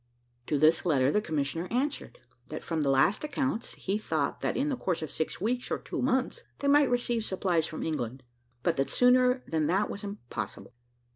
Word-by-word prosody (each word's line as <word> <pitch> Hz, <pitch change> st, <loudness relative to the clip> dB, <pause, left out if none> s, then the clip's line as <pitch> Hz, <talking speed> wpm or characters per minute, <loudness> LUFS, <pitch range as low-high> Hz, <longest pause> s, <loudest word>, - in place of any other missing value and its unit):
To 150 Hz, -, +1 dB
this 155 Hz, +3 st, +4 dB
letter 140 Hz, -6 st, +3 dB
the 210 Hz, -, +2 dB
commissioner 160 Hz, -1 st, -2 dB
answered, 280 Hz, -, -2 dB, 0.3 s
that -, -, -6 dB
from 165 Hz, -2 st, -1 dB
the 140 Hz, -, +1 dB
last 135 Hz, -, +3 dB
accounts, 270 Hz, -5 st, -2 dB
he 200 Hz, +2 st, -2 dB
thought -, -, -1 dB
that -, -, -1 dB
in 280 Hz, +3 st, +1 dB
the 275 Hz, -, 0 dB
course 180 Hz, -9 st, -2 dB
of 155 Hz, -, -5 dB
six 160 Hz, -, -2 dB
weeks 245 Hz, +6 st, -1 dB
or -, -, 0 dB
two -, -, -5 dB
months, 260 Hz, -, 0 dB
they 280 Hz, -, -2 dB
might 285 Hz, -1 st, +5 dB
receive 240 Hz, -2 st, 0 dB
supplies 180 Hz, -5 st, 0 dB
from 160 Hz, -, -5 dB
England, 130 Hz, -5 st, -3 dB, 0.4 s
but 170 Hz, -3 st, +1 dB
that 135 Hz, -, +1 dB
sooner 250 Hz, +1 st, +4 dB
than 155 Hz, -2 st, 0 dB
that 195 Hz, +5 st, +1 dB
was 200 Hz, -, -7 dB
impossible. 200 Hz, -11 st, -6 dB
195 Hz, 195 wpm, -29 LUFS, 155-250 Hz, 0.4 s, might